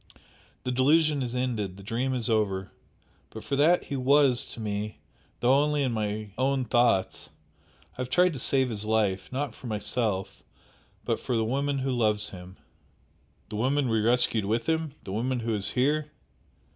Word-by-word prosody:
The 125 - -2
delusion 145 +3 +3
is 125 -1 -3
ended 110 -7 -2
the 100 - -11
dream 125 +5 -1
is 120 -2 0
over! 100 -4 0 0.6
But 110 - -9
for 140 - -2
that 165 +5 +4
he 140 - -5
WAS 135 -1 +3
to - - -10
me, 105 0 -4 0.4
though 125 +2 +4
only 145 +1 +2
in 130 - 0
my 105 -1 -3
own 135 0 +1
thoughts, 120 -6 +1 0.6
I - - -29
have 125 - -4
tried 180 +4 +3
to 135 - -6
save 130 +1 +2
his 105 -3 -3
life 105 -4 0
not 135 -1 -3
for 125 - -10
myself, 105 -2 -2 0.6
but - - 0
for 125 - -2
the 110 - +1
woman 140 +4 0
who 135 0 -1
loves 105 -3 +1
him." 90 0 -11 0.9
"The 105 - -5
woman 130 +3 +1
we 110 -1 +2
rescued 115 -2 +2
with 115 +3 -1
him? 160 -3 -1
the 95 - -7
woman 120 +4 -1
who 115 0 -1
is 105 -1 +1
here?" 150 +5 +1
120 Hz, 175 wpm, -27 LUFS, 105-135 Hz, 0.9 s, that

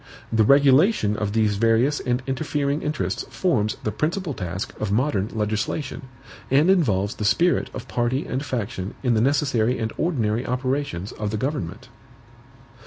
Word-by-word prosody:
The 110 -1 +4
regulation 140 - +4
of 105 -1 -2
these 110 -2 +2
various 115 +7 +3
and 125 +1 -1
interfering 140 +1 -1
interests 150 0 -2
forms 110 - 0
the 105 - -1
principal 165 - -2
task 90 -2 -5
of 110 -2 -2
modern 105 -3 +1
legislation, 110 +6 -3 0.4
and 150 +7 +4
involves 105 - +2
the - - -6
spirit 170 +12 +2
of 125 - -8
party 120 +3 -1
and 130 +2 -3
faction 105 -7 -4
in 125 -2 +2
the 110 - +2
necessary 130 -3 +2
and 110 -1 -3
ordinary 120 -9 0
operations 125 -7 -2
of 105 -1 -4
the 110 - -2
government. 130 - -3
125 Hz, 150 wpm, -23 LUFS, 105-145 Hz, 0.4 s, The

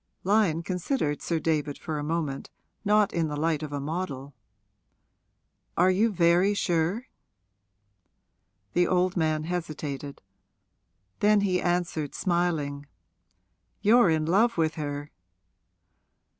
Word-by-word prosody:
Lyon 190 -5 +2
considered 180 - -2
Sir 165 -2 -1
David 150 -2 -1
for 155 -3 -4
a - - -3
moment, 150 -3 -3 0.3
not 210 -1 +3
in 165 -2 0
the 150 - -4
light 160 0 0
of 155 -2 -5
a 145 - -3
model. 145 -3 -4 1.4
'Are 180 +2 +5
you 215 +5 +2
very 180 +2 +3
sure?' 175 +6 0 1.7
The 175 -1 +3
old 180 0 +1
man 155 -3 0
hesitated; 155 -5 -5 1.0
then 210 0 +4
he 185 -2 +1
answered, 175 -4 -1
smiling, 160 -6 -1 1.0
'You're 220 -1 +6
in 160 -1 +1
love 210 +7 +3
with 160 -1 +1
her.' 145 -1 -5
165 Hz, 115 wpm, -27 LUFS, 150-185 Hz, 1.7 s, You're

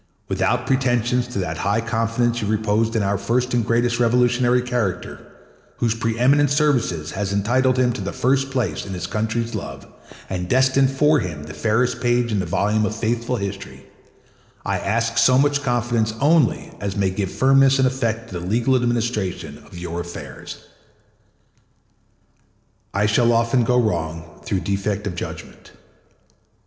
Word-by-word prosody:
Without - - 0
pretensions 125 -2 +1
to 125 - -7
that 80 -4 -3
high 100 +3 +1
confidence 115 +1 0
you 105 - -2
reposed 110 +1 0
in 110 - +1
our 100 0 0
first 125 +5 0
and 120 -1 +2
greatest 120 +2 +1
revolutionary 125 +1 +3
character, 120 -7 -2 0.6
whose 115 -2 +1
preeminent 125 +6 +2
services 125 - +1
had 100 0 -3
entitled 120 +6 +1
him 125 -1 +2
to 105 - -5
the 100 - -3
first 135 +2 +1
place 115 - -2
in 95 -1 -6
his 90 -2 -4
country's 110 +4 -2
love - - -6 0.4
and 90 -1 -4
destined 130 +1 +3
for 150 +3 +3
him 75 -5 -5
the 80 +1 -9
fairest 110 +11 0
page 120 -1 +1
in 105 - 0
the 90 - -2
volume 105 +5 +1
of 105 0 -1
faithful 115 +2 -1
history, 100 -2 -6 0.8
I - - -1
ask 115 +1 0
so 130 0 +5
much 145 +1 +2
confidence 120 -4 0
only 150 -2 +2
as 100 0 -4
may 95 -1 +1
give 95 0 -3
firmness 135 0 +4
and 130 -1 +3
effect 115 -3 -2
to 90 - -4
the 85 - -7
legal 120 +6 +2
administration 110 - -2
of 85 - -12
your 85 -1 -5
affairs. 80 -6 -8 2.3
I 100 +1 +1
shall 115 +3 +3
often 115 +2 +2
go 125 +2 +2
wrong 85 -6 -3
through 95 -2 -2
defect 100 +2 -2
of 100 - -3
judgment. 85 - -8
115 Hz, 160 wpm, -21 LUFS, 100-125 Hz, 2.3 s, so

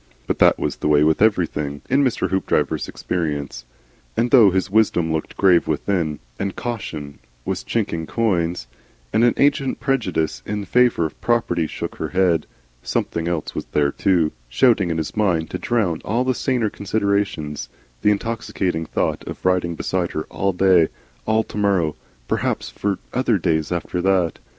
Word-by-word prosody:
But - - -2
that - - +5
was - - -2
the - - -2
way 75 0 +5
with 80 +3 +2
everything 80 -9 +1
in 140 +2 +3
Mr. 125 -7 0
Hoopdriver's 95 0 0
experience. 75 -8 -3 0.5
And 120 +1 +1
though 115 -7 +8
his 95 +1 -1
Wisdom 85 -7 +2
looked 80 - -4
grave 90 -3 +4
within 80 +6 0 0.2
him, 75 - -11 0.2
and 100 -1 -2
Caution 80 -12 -5 0.3
was - - -2
chinking 80 -1 -2
coins, 90 - 0 0.5
and 115 - +3
an 120 - +4
ancient 140 -1 +2
prejudice 100 - -1
in 105 -1 -4
favour 120 -4 +3
of 80 - -7
Property 90 -9 +1
shook - - -6
her - - -2
head, 90 -4 +2 0.3
something 85 +6 -2
else 85 -3 -2
was - - -4
there 70 -1 +2
too, 85 -4 +2 0.2
shouting 100 - +3
in 80 - -1
his 80 - -3
mind 90 -7 +1
to - - -3
drown 100 -9 0
all 120 +4 0
these 130 -1 -1
saner 120 -6 0
considerations, 100 - -1 0.3
the 105 - +4
intoxicating 100 -6 -1
thought - - -1
of - - -8
riding 90 -2 +1
beside 90 +1 -2
Her 80 - -2
all 95 +5 0
to 90 - -14 0.3
day, - - -27 0.4
all 110 0 +3
to - - -9
morrow, 95 -7 +1 0.3
perhaps - - -1
for 100 -2 -2 0.2
other 125 -4 +2
days 80 -3 0
after 90 +1 -2
that. 95 -3 +1
95 Hz, 170 wpm, -21 LUFS, 80-110 Hz, 0.5 s, though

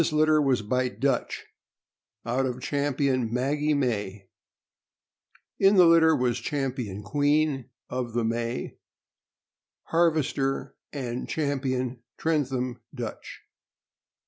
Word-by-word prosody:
This 165 - +1
litter 155 0 +4
was 130 -6 +2
by 125 +4 0
Dutch, 135 +6 -1 0.8
out 130 +3 0
of 125 0 -4
Champion 135 -3 0
Maggie 145 +5 +1
May. 105 -7 -2 1.3
In 195 +1 +5
the 180 -2 +7
litter 165 -1 +6
was 125 -3 0
Champion 130 - -3
Queen 145 +2 +1 0.2
of 125 -2 -4
the 120 0 0
May, 115 +1 -3 1.0
Harvester, 155 -5 0 0.2
and 125 -4 -4
Champion 130 -4 -1 0.2
Trentham 130 -6 -1
Dutch. - - -7
135 Hz, 100 wpm, -26 LUFS, 125-150 Hz, 1.3 s, the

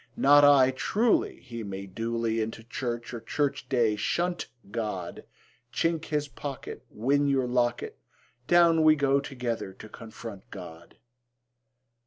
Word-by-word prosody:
Not 145 +1 +6
I; 140 -2 +7
truly 210 - +1
He 115 -2 -7
may 100 -1 -6
duly 115 +3 -2
Into 110 +1 -4
church 120 0 -4
or 115 - -5
church 140 +1 -2
day 120 -5 +2
shunt 175 +10 -1 0.2
God; 105 -6 -4 0.5
Chink 165 +2 0
his 150 -1 -1
pocket, 140 -1 -7
Win 140 +6 +1
your 135 -2 +2
locket; 120 -1 -1 0.5
Down 170 -2 +5
we 155 0 +6
go 140 -1 +2
together 125 -7 -4
to 110 - -12
confront 110 -3 -10
God. 85 -3 -11
125 Hz, 130 wpm, -28 LUFS, 115-145 Hz, 0.5 s, I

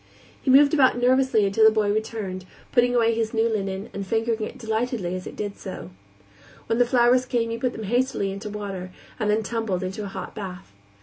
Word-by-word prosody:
He - - -2
moved 280 +3 +6
about 265 -5 +4
nervously 250 -3 +3
until 200 +3 +2
the 220 - +9
boy 215 -2 +1
returned, 210 -4 -4 0.3
putting 245 0 +3
away 230 -1 +3
his 225 0 -2
new 225 +1 +3
linen 195 -2 -2
and 200 - -4
fingering 225 +2 -1
it 215 - -5
delightedly 220 -4 -2
as 185 - -6
he - - -6
did 205 -1 -6
so. 185 - -7 0.7
When 230 - 0
the 245 - +4
flowers 250 +1 +3
came 230 -2 0
he 230 - -3
put 250 -2 -1
them 220 - -6
hastily 240 -2 0
into 200 +2 -6
water, 200 -3 -5 0.3
and 215 - 0
then 215 +1 +2
tumbled 215 -4 -2
into 190 +3 -4
a - - -4
hot 195 -1 -7
bath. 185 - -8
220 Hz, 205 wpm, -24 LUFS, 195-240 Hz, 0.7 s, the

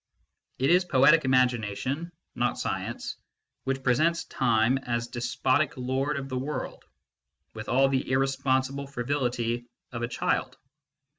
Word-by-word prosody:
It 135 +5 +2
is 180 +1 +5
poetic 150 -1 +5
imagination, 130 - +1 0.2
not 120 0 0
science, - - -4 0.5
which 135 0 -2
presents 155 +7 +2
Time 120 +1 +2
as 120 -2 -2
despotic 130 +5 0
lord 130 +3 -1
of 135 -1 -4
the 130 -1 -3
world, 145 +4 -5 0.7
with 110 0 -7
all 135 +1 +4
the 135 -1 -1
irrespon 135 0 +2
~ible 140 +1 -6
frivolity 120 -3 -1 0.2
of 120 -1 -5
a 120 - 0
child. 120 - -1
130 Hz, 130 wpm, -27 LUFS, 120-140 Hz, 0.7 s, is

